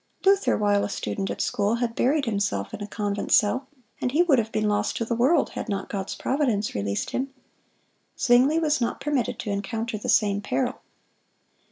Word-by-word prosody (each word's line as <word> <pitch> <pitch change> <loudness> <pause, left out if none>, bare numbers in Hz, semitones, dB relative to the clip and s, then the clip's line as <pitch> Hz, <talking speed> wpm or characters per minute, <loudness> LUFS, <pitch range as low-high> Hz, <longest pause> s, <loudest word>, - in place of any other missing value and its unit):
Luther, 390 0 +4
while 205 -1 +2
a - - -2
student 195 0 -3
at - - -3
school, 205 +2 +1
had 235 -1 -1
buried 275 +5 +1
himself 200 - -1
in - - -6
a 205 - -4
convent 205 -1 -3
cell, 255 +6 +3 0.3
and 250 - 0
he 320 +6 +4
would 290 -8 +4
have 225 0 -2
been 215 -1 0
lost 210 0 0
to 230 - -1
the 235 - -2
world 255 +9 +3
had - - -5
not 195 -1 -3
God's 195 -1 -4
providence 245 -7 0
released 100 0 -2
him. 265 +2 -2 0.9
Zwingle 265 +6 +4
was 300 -4 +1
not 235 - -1
permitted 275 -5 -1
to 210 - -4
encounter 220 +2 -3
the - - -5
same 205 -1 +3
peril. 250 +4 -2
225 Hz, 190 wpm, -25 LUFS, 205-260 Hz, 0.9 s, Luther